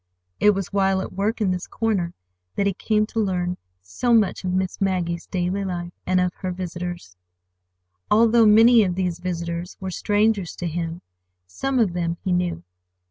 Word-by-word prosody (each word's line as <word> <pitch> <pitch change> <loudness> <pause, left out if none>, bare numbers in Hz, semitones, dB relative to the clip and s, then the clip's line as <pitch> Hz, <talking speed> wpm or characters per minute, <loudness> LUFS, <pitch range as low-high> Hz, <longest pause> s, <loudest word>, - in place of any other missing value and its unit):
It 210 -1 +5
was 195 0 -4
while 195 -1 +2
at - - -6
work 210 +4 -1
in 195 -3 +2
this 180 -1 -3
corner 195 -7 -1 0.4
that 200 - +1
he 200 - +2
came 215 +3 +1
to 225 - -4
learn 180 -3 -1 0.3
so 90 - +1
much 210 -4 +2
of 185 - -1
Miss 185 +1 -2
Maggie's 175 -3 -1
daily 185 +2 -1
life, 175 -2 -4
and 185 0 +3
of 180 0 +1
her 185 - -3
visitors. 175 - -6 0.9
Although 230 +1 +5
many 225 +2 +7
of 180 -3 -1
these 180 -2 -1
visitors 170 0 -4
were 190 -1 -4
strangers 205 -1 +1
to 175 - -5
him, 165 0 -4 0.4
some 260 - -2
of 215 -8 +2
them 170 -1 -2
he 190 - -1
knew. 175 - 0
185 Hz, 175 wpm, -23 LUFS, 175-205 Hz, 0.9 s, many